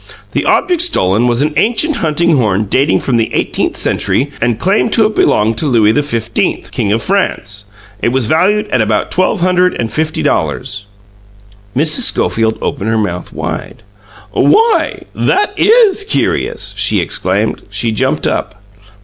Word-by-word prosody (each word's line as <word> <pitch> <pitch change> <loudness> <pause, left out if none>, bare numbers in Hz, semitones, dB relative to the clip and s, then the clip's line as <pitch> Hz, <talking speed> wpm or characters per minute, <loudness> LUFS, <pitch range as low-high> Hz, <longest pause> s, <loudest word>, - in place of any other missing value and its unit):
The - - -2
object 360 -3 +2
stolen 115 - +1
was 120 +3 +1
an 150 0 -1
ancient 240 - +1
hunting 165 +1 +1
horn 105 -4 +1
dating 135 +9 +1
from 125 -3 0
the 115 - -1
eighteenth - - -1
century 140 +3 0
and 120 -1 +1
claimed 200 - +1
to 225 - +5
have 215 0 0
belonged 110 +1 +2
to 155 - 0
Louis 110 -5 +3
XV, 120 -5 -2
King 100 - -1
of 115 +2 0
France. 105 - -2 0.4
It - - 0
was 130 0 0
valued 190 - +1
at 130 - +1
about 110 -1 -1
twelve 185 +1 +1
hundred 180 0 +2
and 115 -2 -4
fifty 155 0 -2
dollars." 100 0 -2 0.9
Mrs. 155 - +3
Schofield 110 0 0
opened 105 - -2
her 110 - +1
mouth 90 -5 -3
wide. 115 - -6 0.5
"Why, 455 +1 +2
that 405 +1 0
IS 425 -2 +4
curious!" 425 - -1
she - - +2
exclaimed. - - -1
She 115 - -1
jumped 110 - -1
up. 105 -1 -3
135 Hz, 155 wpm, -13 LUFS, -, 0.9 s, to